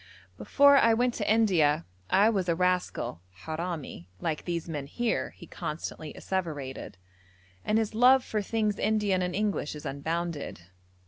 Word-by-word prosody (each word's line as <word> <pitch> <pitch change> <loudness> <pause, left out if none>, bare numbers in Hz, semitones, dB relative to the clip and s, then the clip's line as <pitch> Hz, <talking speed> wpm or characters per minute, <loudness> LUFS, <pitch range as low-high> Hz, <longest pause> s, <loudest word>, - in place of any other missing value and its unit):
'Before 280 0 +5
I 230 -3 +5
went 245 +1 +1
to 210 -2 -1
India 170 -9 +3 0.2
I 200 +3 +5
was 190 -5 -1
a 170 - +2
rascal 180 - -1 0.2
(harami) 160 - -5
like 160 -2 -3
these 170 -2 -3
men 145 -4 -4
here,' 240 +9 -1
he 175 - -11
constantly 155 -1 -6
asseverated, 150 - -4 0.7
and 215 - +1
his 220 -1 0
love 250 +3 +6
for 215 - -1
things 210 0 -1
Indian 210 -4 +1
and 180 0 -2
English 200 -8 -1
is 150 - -9
unbounded. 160 - -3
180 Hz, 145 wpm, -28 LUFS, 155-215 Hz, 0.7 s, love